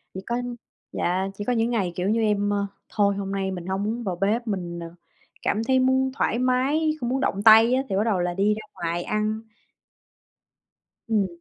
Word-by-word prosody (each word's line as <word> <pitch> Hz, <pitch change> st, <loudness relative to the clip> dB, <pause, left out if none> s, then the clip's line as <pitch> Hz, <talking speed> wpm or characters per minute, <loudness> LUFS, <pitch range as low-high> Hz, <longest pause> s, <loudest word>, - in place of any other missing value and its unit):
Chỉ 190 Hz, -, -4 dB
có 240 Hz, +1 st, -1 dB, 0.5 s
dạ, 185 Hz, +2 st, 0 dB
chỉ 205 Hz, -, -5 dB
có 250 Hz, -, +1 dB
những 230 Hz, 0 st, +1 dB
ngày, 205 Hz, -7 st, 0 dB
kiểu 185 Hz, +3 st, -1 dB
như, 225 Hz, +1 st, +2 dB
em, 205 Hz, -1 st, +1 dB
ơ, 200 Hz, 0 st, 0 dB, 0.2 s
"Thôi, 200 Hz, -1 st, +2 dB
hôm 195 Hz, -1 st, -4 dB
nay 195 Hz, -1 st, -1 dB
mình 180 Hz, -2 st, -6 dB
hông 190 Hz, +1 st, -1 dB
muốn 230 Hz, +3 st, -2 dB
vào 190 Hz, -4 st, -2 dB
bếp, 215 Hz, +6 st, 0 dB
mình, 175 Hz, -4 st, -3 dB
ờ, 170 Hz, 0 st, -8 dB, 0.5 s
cảm 215 Hz, -, 0 dB
thấy 260 Hz, +2 st, +3 dB
muốn 260 Hz, 0 st, +2 dB
thoải 245 Hz, -3 st, 0 dB
mái, 265 Hz, +5 st, +2 dB
không 240 Hz, -, -2 dB
muốn 265 Hz, -, 0 dB
động 200 Hz, -6 st, -1 dB
tay" 225 Hz, +2 st, +8 dB
á, 260 Hz, -, +3 dB
thì 190 Hz, -, -1 dB
bắt 200 Hz, -, +2 dB
đầu 215 Hz, -5 st, +1 dB
là 175 Hz, 0 st, 0 dB
đi 200 Hz, +3 st, +2 dB
ra 215 Hz, -, -5 dB
ngoài 170 Hz, 0 st, -3 dB
ăn. 215 Hz, +2 st, -1 dB, 1.7 s
Ừm. 215 Hz, -4 st, +2 dB
210 Hz, 210 wpm, -24 LUFS, 190-235 Hz, 1.7 s, tay